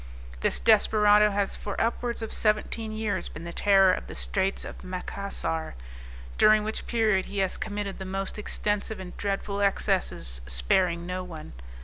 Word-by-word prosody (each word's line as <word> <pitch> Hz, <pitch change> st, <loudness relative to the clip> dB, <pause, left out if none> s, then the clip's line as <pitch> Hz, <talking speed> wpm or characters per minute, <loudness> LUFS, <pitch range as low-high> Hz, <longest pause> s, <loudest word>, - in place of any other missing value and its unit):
This -, -, 0 dB
desperado 210 Hz, -, +5 dB
has 200 Hz, -1 st, 0 dB
for 205 Hz, -, -5 dB
upwards 235 Hz, 0 st, -1 dB
of 220 Hz, -, -5 dB
seventeen 215 Hz, +1 st, 0 dB
years 215 Hz, -1 st, -2 dB
been 155 Hz, -, -9 dB
the 170 Hz, 0 st, -7 dB
terror 195 Hz, -2 st, +5 dB
of -, -, -4 dB
the -, -, -8 dB
Straits 195 Hz, 0 st, -1 dB
of -, -, -9 dB
Macassar, 185 Hz, -, -4 dB, 0.6 s
during 215 Hz, 0 st, +6 dB
which 215 Hz, +1 st, -3 dB
period 215 Hz, -5 st, +2 dB
he 205 Hz, -, -8 dB
has 190 Hz, -1 st, 0 dB
committed 205 Hz, -2 st, -4 dB
the -, -, -4 dB
most 195 Hz, +2 st, -4 dB
extensive 210 Hz, 0 st, -2 dB
and 180 Hz, -1 st, -8 dB
dreadful 200 Hz, 0 st, -2 dB
excesses 190 Hz, -, 0 dB
sparing 170 Hz, -, +3 dB
no 180 Hz, +1 st, -4 dB
one. 165 Hz, -, -9 dB
200 Hz, 155 wpm, -27 LUFS, 185-210 Hz, 0.6 s, during